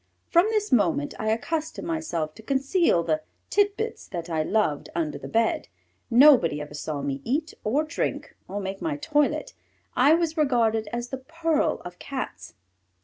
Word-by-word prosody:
From 345 +4 +4
this 425 -4 0
moment 175 - +2
I 215 - -1
accustomed 315 +8 -2
myself 175 - -2
to 220 - -13
conceal 275 - +2
the 155 -2 0 0.3
titbits 415 +2 0
that 170 -2 -6
I 160 -1 +1
loved 155 -4 0
under 160 -3 -2
the - - -7
bed. 225 0 +1 0.4
Nobody 240 - +6
ever 150 0 -7
saw 145 -1 -4
me 140 -1 -2
eat, 305 +6 -1
or 270 +9 +1
drink, 310 - -3
or 200 +2 -4
make 195 0 -5
my 310 -3 -1
toilet. 295 -1 0 0.4
I 285 +5 +6
was 330 -1 -1
regarded 230 -7 +2
as 240 0 -4
the 265 - -4
pearl 320 +2 0
of 180 0 -9
Cats. 100 - -6
240 Hz, 160 wpm, -26 LUFS, -, 0.4 s, Nobody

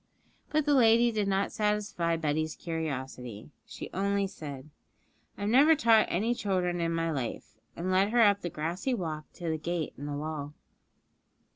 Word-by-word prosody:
But 305 -1 +1
the 295 - +3
lady 235 -2 +5
did 210 -3 -1
not 195 0 +1
satisfy 210 -5 0
Betty's 155 0 -1
curiosity; 130 -8 -5 0.2
she - - -8
only 200 +1 +1
said, 150 -7 -8 0.7
'I - - -9
have 205 - 0
never 290 +6 +6
taught 230 -7 +5
any 215 +7 +1
children 180 -5 -1
in 165 0 0
my 165 0 0
life,' 125 -5 -5 0.2
and 180 +2 -2
led 190 +2 +3
her 235 +1 +3
up 200 -1 +4
the 175 - -3
grassy 170 - -2
walk 155 -6 -5
to 175 - -7
the 160 -1 -1
gate 170 0 -3
in 145 - -5
the 145 -1 -3
wall. 150 -1 -5
175 Hz, 170 wpm, -29 LUFS, 155-210 Hz, 0.7 s, never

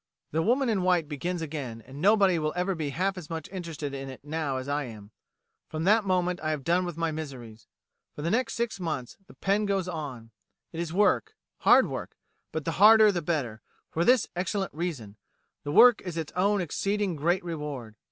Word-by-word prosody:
'The 160 - +1
Woman 250 +8 +2
in 215 -5 +1
White' 180 -4 +2
begins 165 +4 -3
again, 135 -8 -6
and 135 +4 -10
nobody 195 -3 +4
will 155 0 -1
ever 180 +2 0
be 155 -4 -3
half 185 +6 -1
as 155 - -11
much 160 -2 -5
interested 165 -6 -5
in 135 0 -5
it 130 +1 -11
now 150 -3 -2
as 130 +1 -5
I 145 0 -1
am. 110 -3 -11 0.6
From 155 0 -4
that 215 +4 +4
moment 180 -1 0
I 155 - -1
have 150 -3 -2
done 175 +4 +2
with 175 -2 -6
my 165 -1 0
miseries. 130 -8 -8 0.5
For 150 - -6
the 170 - 0
next 235 -1 0
six 235 -3 -2
months 155 -8 -4
the - - -16
pen 205 +2 +1
goes 195 -2 0
on. 140 -9 -6 0.4
It 165 - -5
is 170 -2 -3
work, 210 - +2 0.2
hard - - +6
work; - - -6 0.3
but 160 -2 -4
the 165 +2 -3
harder 215 0 +8
the 175 -3 -2
better, 140 -10 -2 0.3
for 165 - 0
this 245 +2 +4
excellent 190 +2 -2
reason: 145 - -5 0.5
the 145 - -3
work 240 +8 +7
is 175 -3 -6
its 160 -2 -4
own 200 +2 +2
exceeding 195 +2 -1
great 175 +5 +1
reward. 150 -9 -5
165 Hz, 200 wpm, -28 LUFS, 145-190 Hz, 0.6 s, harder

